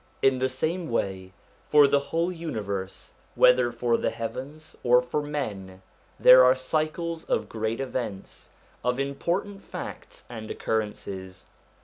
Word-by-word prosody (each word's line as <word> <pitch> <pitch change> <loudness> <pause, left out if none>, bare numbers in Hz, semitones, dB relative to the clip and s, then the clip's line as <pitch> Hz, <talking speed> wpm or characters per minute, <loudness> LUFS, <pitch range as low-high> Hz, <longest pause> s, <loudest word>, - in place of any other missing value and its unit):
In 135 -1 +4
the 130 +1 +1
same 160 +6 -2
way, 95 -5 -2 0.4
for 150 -1 +7
the 140 0 +3
whole 165 +5 -1
universe, 105 - -5 0.2
whether 125 -1 +5
for 120 -1 +1
the - - 0
heavens 135 +7 -7
or 125 0 +6
for 125 +4 -2
men, 100 -11 -5 0.4
there 130 0 +9
are 130 +1 +6
cycles 155 +4 -2
of - - -1
great 110 0 -3
events, 125 -7 -5 0.3
of 125 +1 0
important 170 +9 -2
facts - - -8
and 110 -2 -8
occurrences. 95 -4 -4
130 Hz, 130 wpm, -26 LUFS, 110-150 Hz, 0.4 s, there